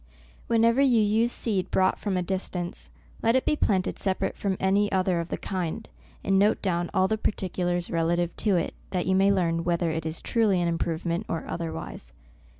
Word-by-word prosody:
Whenever 230 +3 +3
you 255 -5 +4
use 220 +3 +3
seed 200 -7 0
brought 185 0 +2
from 200 -3 -1
a 180 - 0
distance, 180 -1 -4 0.3
let 230 +2 +3
it 260 - +2
be - - +2
planted 190 -9 0
separate 190 -2 -1
Irom 195 -2 -2
any 200 +2 +2
other 185 -2 +1
of 170 0 -4
the - - -2
kind, 180 -4 -4 0.4
and 195 0 +3
note 205 +2 +3
down 175 -3 -1
all 185 - +2
the 220 +2 -1
par 215 - 0
ticulars 175 -2 -2
relative 170 0 0
to 205 -3 +2
it, 170 - -1 0.2
that 180 -2 -1
you 190 - +1
may 195 +1 +4
learn 170 -3 +1
whether 170 -1 0
it 160 0 -3
is 160 +1 -3
truly 215 -5 +1
an 175 - +1
improvement 170 +3 -2
or 165 - -3
other 165 -1 -3
wise. 60 -6 -8
185 Hz, 200 wpm, -26 LUFS, 170-205 Hz, 0.4 s, you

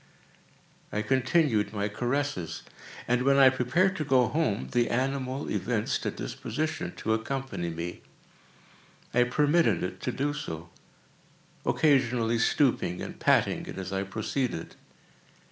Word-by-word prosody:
I 105 - -1
continued 130 -4 +2
my 100 -1 -1
caresses, 120 - -2 0.4
and, 125 +1 +2
when 140 +1 +4
I 135 -1 +8
prepared 135 +10 +2
to 155 - -1
go 130 -5 +3
home, 145 -9 0
the 120 -1 +2
animal 130 +2 -1
evinced 110 -3 -1
a - - +2
disposition 155 - -4
to 110 - -1
accompany 110 -5 -3
me. 85 +1 -5 1.1
I 125 +1 +4
permitted 145 - +2
it 90 0 -4
to - - -1
do 145 +2 -1
so; 85 - -6 1.0
occasionally 125 -6 +2
stooping 115 -8 +2
and - - -7
patting - - +2
it - - -7
as 95 0 -5
I 95 - 0
proceeded. 110 0 -3
125 Hz, 130 wpm, -28 LUFS, 105-140 Hz, 1.1 s, I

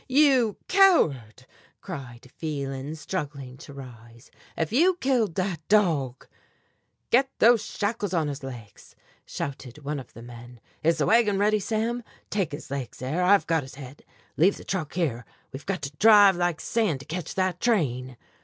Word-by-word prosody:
"You 260 -6 +4
coward!" 140 - +3 0.3
cried 130 -8 -9
Phelan, 140 -2 -4
struggling 145 -5 -5
to 145 - -12
rise, 115 -4 -13 0.3
"if 160 +4 -2
you 350 +8 +4
killed 250 - 0
that 185 -3 -1
dog 160 - +1 0.4
" - - -47
"Get 265 +3 +4
those 230 -1 +5
shackles 205 -2 -3
on 165 -4 0
his 145 -1 -5
legs," 120 -6 -11 0.3
shouted 135 0 -6
one 145 +1 -3
of 130 - -12
the 115 - -11
men. 120 0 -12 0.2
"Is 165 +1 +2
the 150 - +1
wagon 220 -3 +3
ready, 210 +1 +2
Sam? 225 +4 -2 0.3
Take 195 -5 -1
his 145 -1 -8
legs 135 -3 -5
there, 135 +8 -2
I've 195 +2 +4
got 165 -1 +1
his 130 -1 -11
head. 135 0 -11 0.3
Leave 185 +6 +4
the - - -11
truck 175 -6 -4
here, 140 -10 -1 0.3
we've 135 +1 -9
got 190 -7 -2
to 140 +1 -5
drive 205 -2 +7
like 175 -2 -1
sand 210 - 0
to - - -12
catch 165 0 -5
that 185 -2 0
train!" 130 - 0
160 Hz, 165 wpm, -26 LUFS, 135-205 Hz, 0.4 s, drive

